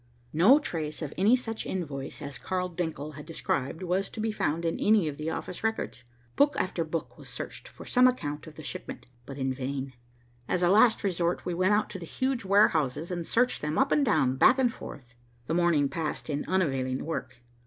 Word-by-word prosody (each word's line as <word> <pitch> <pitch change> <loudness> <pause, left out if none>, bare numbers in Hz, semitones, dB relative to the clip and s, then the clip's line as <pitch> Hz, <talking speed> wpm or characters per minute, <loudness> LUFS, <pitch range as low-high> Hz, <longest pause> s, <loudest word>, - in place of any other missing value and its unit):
No 190 - +7
trace 160 - -4
of 150 - -5
any 210 +6 +5
such 225 -3 -4
invoice 145 -9 -5
as 140 -2 -6
Carl 180 -1 -2
Denckel 160 -4 -4
had 150 - -8
described 160 -1 -2
was 185 +2 0
to - - -9
be 220 0 0
found 170 -5 -1
in 165 - -1
any 210 -5 +4
of 145 -2 -4
the 155 +1 -3
office 180 +5 -5
records. 220 - -2 0.3
Book 290 +1 +4
after 185 -2 0
book 165 +1 -5
was - - -11
searched - - -7
for - - -12
some 250 0 +5
account 150 -12 -2
of 155 - -11
the 155 - -9
shipment, - - -6 0.2
but 135 - -7
in 130 -1 -1
vain. 135 0 -4 0.5
As 180 - 0
a 175 - +4
last 220 +4 +5
resort, 175 -3 0
we 180 - -1
went 185 +4 +2
out 210 - +1
to 190 - -5
the 170 - -8
huge 260 +2 -1
warehouses 165 -6 +3
and 175 -2 -3
searched 250 +2 +2
them, 150 +1 -2
up 270 - +3
and 295 - +4
down, 145 - +2
back 250 - +6
and 250 -3 +2
forth. 125 -4 -10 0.3
The 160 - -2
morning 170 -4 +3
passed 155 +1 -3
in 145 0 -2
unavailing 135 -8 0
work. 130 -6 -4
170 Hz, 205 wpm, -28 LUFS, 145-205 Hz, 0.5 s, No